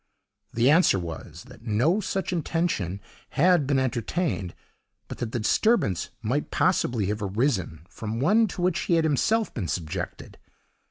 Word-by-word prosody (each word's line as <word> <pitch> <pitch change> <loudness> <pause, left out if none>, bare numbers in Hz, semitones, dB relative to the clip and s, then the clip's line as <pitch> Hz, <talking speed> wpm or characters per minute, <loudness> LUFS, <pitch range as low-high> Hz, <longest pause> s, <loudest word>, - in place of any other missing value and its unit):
The 120 +4 +3
answer 165 - +5
was, 85 -4 -7
that - - -15
no 120 - +1
such 190 -1 -2
intention 160 - -1 0.4
had 170 -2 +4
been 140 -1 +2
entertained, 130 - -1 0.5
but - - -8
that 115 -2 -3
the - - -2
disturbance 115 - +1
might 130 +7 -1
possibly 125 - +1
have 105 +2 -2
arisen 95 - -1
from 110 +2 -5
one 210 - +4
to 180 -2 -5
which 180 -2 +1
he 170 - +2
had 165 - +3
himself 205 - +1
been 100 -8 -3
subjected. 75 0 -5
125 Hz, 150 wpm, -26 LUFS, 105-175 Hz, 0.5 s, answer